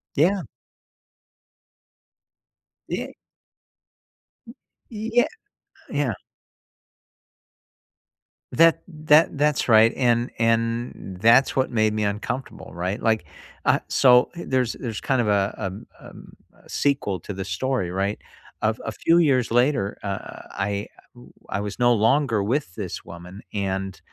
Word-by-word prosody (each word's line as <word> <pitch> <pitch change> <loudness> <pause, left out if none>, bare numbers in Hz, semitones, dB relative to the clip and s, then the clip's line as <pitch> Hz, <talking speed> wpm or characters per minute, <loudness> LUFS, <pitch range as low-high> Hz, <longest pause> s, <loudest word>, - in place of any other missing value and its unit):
Yeah. 185 +6 +3 2.5
Yea - - -4 1.8
Yeah, 230 +2 +1 0.6
yeah 140 -5 0 2.4
That 165 +1 +4
that 155 -2 +3
that's 150 0 +1
right, 110 -1 +5
and 120 -1 +1
and 115 -3 -1
that's 120 +5 +5
what 130 - +1
made 110 -2 +1
me 105 - 0
uncomfortable, 105 +6 -4
right, 90 +5 -3
like, 110 -5 +1 0.4
uh, - - +4
so 125 -1 +5
there's 130 -8 -1
there's 115 -5 -5
kind 130 -3 +1
of 105 - -2
a, 100 -1 +1
um 95 -1 -6
um, - - -14 0.3
a - - -21
sequel 135 -10 0
to 100 - -7
the 95 0 -5
story, 100 +1 -1
right, 100 +3 -1 0.4
a 110 +1 +1
a 115 - -3
few 165 +9 +2
years 135 -8 +3
later, 120 -3 +1
uh, 100 -1 -6
I 100 +1 -3 0.6
I 100 - -2
was 105 -1 -5
no 120 -1 +4
longer 115 0 +2
with 115 -5 -1
this 95 -5 -5
woman, 85 +3 -10
and, 95 -1 -3
115 Hz, 115 wpm, -23 LUFS, 100-135 Hz, 2.5 s, right